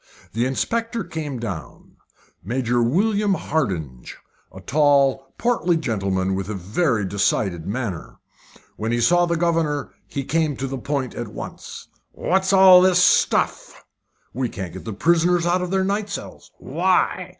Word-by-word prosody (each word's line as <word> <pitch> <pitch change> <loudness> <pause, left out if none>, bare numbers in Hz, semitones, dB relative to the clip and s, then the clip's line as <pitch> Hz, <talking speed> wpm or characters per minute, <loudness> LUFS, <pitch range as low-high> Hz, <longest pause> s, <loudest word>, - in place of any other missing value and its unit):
The 120 +3 0
inspector 230 - -2
came 150 -5 -5
down 100 -9 -7 0.5
Major 120 +3 0
William 200 - +1
Hardinge. 90 - -3 0.4
A - - -11
tall, 140 -2 +2
portly 180 -8 +1
gentleman, 95 -9 -1
with 95 +1 -3
a 105 - -3
very 105 - 0
decided 95 -3 -1
manner. 95 - -4 0.6
When 110 +1 -2
he 120 - 0
saw 175 +8 +3
the 170 0 0
governor 160 -4 0
he 140 - -4
came 155 0 0
to 135 - -3
the 135 0 -4
point 135 -1 -3
at - - -5
once. - - -9 0.3
"What's 190 +1 0
all 190 -2 +8
this 185 -1 +4
stuff?" 180 - +2 0.5
"We 125 0 -2
can't 95 -6 -7
get 95 - -9
the 110 - -4
prisoners 170 - +2
out 175 +1 +1
of 180 - -3
the 190 0 +1
night 200 +2 -1
cells." 200 - -8
"Why?" - - 0
140 Hz, 150 wpm, -22 LUFS, 110-175 Hz, 0.6 s, all